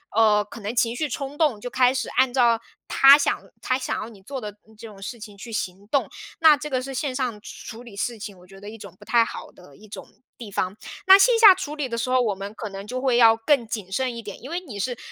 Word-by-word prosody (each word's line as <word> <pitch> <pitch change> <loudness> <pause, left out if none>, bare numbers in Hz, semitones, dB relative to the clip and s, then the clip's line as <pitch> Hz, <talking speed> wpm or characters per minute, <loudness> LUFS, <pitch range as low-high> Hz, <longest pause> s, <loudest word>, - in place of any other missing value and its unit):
呃， 215 -2 +4
可 220 +2 -12
能 210 +4 -5
情 235 0 +1
绪 305 +3 -2
冲 275 +2 -6
动 275 -10 +1
就 245 - -5
开 255 0 +3
始 265 - -3
按 255 -1 +1
照 235 -3 +3 0.3
他 275 +1 +7
想 285 - 0 0.2
他 255 - 0
想 265 - -3
要 220 - -7
你 200 -4 -16
做 270 +2 -6
的 210 - -6 0.3
这 225 +1 -10
种 205 -2 -14
事 230 +4 -7
情 210 -2 -11
去 230 +3 -10
行 195 -1 -5
动， 280 +3 0 0.3
那 315 -3 +6
这 300 +2 -7
个 255 -2 -1
是 270 +1 -7
线 265 0 -3
上 250 -5 -3
处 235 0 -10
理 225 -5 -13
事 235 +3 -3
情 200 -2 -8
我 180 - -18
觉 195 0 -15
得 205 +1 -10
一 225 - -10
种 200 -3 -12
不 - - -15
太 235 -1 +4
好 - - -8
的 180 -6 -18
一 215 - -16
种 205 - -10 0.3
地 225 -4 -10
方。 185 0 -2 0.3
那 385 +1 +10
线 470 +3 +4
下 425 -4 +10
处 300 -5 -6
理 295 -3 -3
的 230 -1 -4
时 235 +2 -2
候， 255 0 +3
我 215 -5 0
们 200 +2 -7
可 220 - -6
能 195 +1 -8
就 255 +2 -4
会 255 -2 +1
要 225 -1 +6
更 235 0 +1
谨 210 -4 -5
慎 250 +2 -2
一 - - -6
点， 205 -2 -10
因 265 - -9
为 345 +2 -3
你 245 - -10
是 245 +3 -3
235 Hz, 295 characters per minute, -23 LUFS, 210-265 Hz, 0.3 s, 那